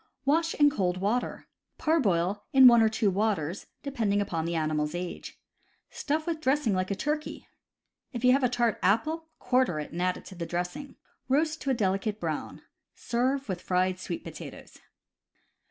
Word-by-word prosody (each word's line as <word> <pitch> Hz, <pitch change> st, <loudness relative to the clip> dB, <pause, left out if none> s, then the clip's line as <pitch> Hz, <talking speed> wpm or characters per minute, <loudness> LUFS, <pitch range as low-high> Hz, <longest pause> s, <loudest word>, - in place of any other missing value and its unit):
Wash 325 Hz, +4 st, +2 dB
in 290 Hz, -1 st, +5 dB
cold 185 Hz, -8 st, 0 dB
water. 210 Hz, +6 st, -1 dB, 0.3 s
Parboil 205 Hz, -, +1 dB
in 265 Hz, -1 st, +8 dB
one 235 Hz, -2 st, +9 dB
or 220 Hz, -, +4 dB
two 215 Hz, -2 st, +1 dB
waters, 195 Hz, -4 st, -1 dB, 0.2 s
depending 225 Hz, -8 st, 0 dB
upon 170 Hz, -5 st, -2 dB
the 170 Hz, 0 st, -2 dB
animal's 155 Hz, 0 st, -1 dB
age. 175 Hz, 0 st, -6 dB, 0.5 s
Stuff 310 Hz, +2 st, -2 dB
with 325 Hz, -2 st, -3 dB
dressing 265 Hz, -6 st, +2 dB
like 185 Hz, 0 st, -1 dB
a 200 Hz, -, -1 dB
turkey. 300 Hz, +8 st, -3 dB, 0.6 s
If 245 Hz, -2 st, -3 dB
you 250 Hz, -, +7 dB
have 270 Hz, +1 st, +3 dB
a 250 Hz, -, +4 dB
tart 240 Hz, -3 st, 0 dB
apple, 310 Hz, -, +1 dB
quarter 250 Hz, -10 st, +1 dB
it 150 Hz, -, -6 dB
and 170 Hz, -, -4 dB
add 180 Hz, 0 st, -1 dB
to -, -, -10 dB
the 170 Hz, -2 st, -5 dB
dressing. 180 Hz, +11 st, -4 dB, 0.3 s
Roast 310 Hz, +4 st, +1 dB
to 275 Hz, -, -3 dB
a 265 Hz, -, +2 dB
delicate 205 Hz, 0 st, -1 dB
brown. 160 Hz, -3 st, -4 dB, 0.3 s
Serve 260 Hz, +3 st, -1 dB
with 185 Hz, -3 st, -4 dB
fried 185 Hz, 0 st, 0 dB
sweet 175 Hz, -2 st, -5 dB
potatoes. -, -, -10 dB
215 Hz, 170 wpm, -28 LUFS, 180-270 Hz, 0.6 s, one